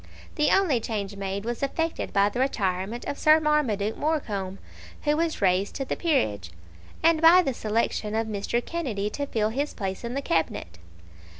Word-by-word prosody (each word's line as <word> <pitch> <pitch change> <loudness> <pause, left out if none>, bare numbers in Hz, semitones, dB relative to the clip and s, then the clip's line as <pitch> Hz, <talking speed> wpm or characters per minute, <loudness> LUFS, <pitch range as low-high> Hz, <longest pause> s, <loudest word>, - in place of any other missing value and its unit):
The 300 -2 +2
only 360 -11 +3
change 210 -3 -4
made 195 +1 -4
was 240 0 -3
effected 325 +4 -2
by 200 +1 +3
the 240 - -5
retirement 205 -3 -1
of 285 - -4
Sir 310 +1 +6
Marmaduke 255 -10 +1
Morecombe, 205 -12 -2 0.5
who 295 0 +2
was 325 -7 -1
raised 190 +1 +2
to 270 - -3
the - - -2
peerage, 105 - 0 0.5
and 325 -1 +4
by 345 +3 +8
the 270 - -1
selection 215 -1 -1
of 225 0 +1
Mr. 220 +3 -2
Kennedy 225 -12 -3
to 285 0 -3
fill 215 -5 0
his 280 +6 -3
place 190 0 -4
in 235 +2 -4
the 275 - -1
Cabinet. 85 - -1
230 Hz, 175 wpm, -26 LUFS, 200-300 Hz, 0.5 s, by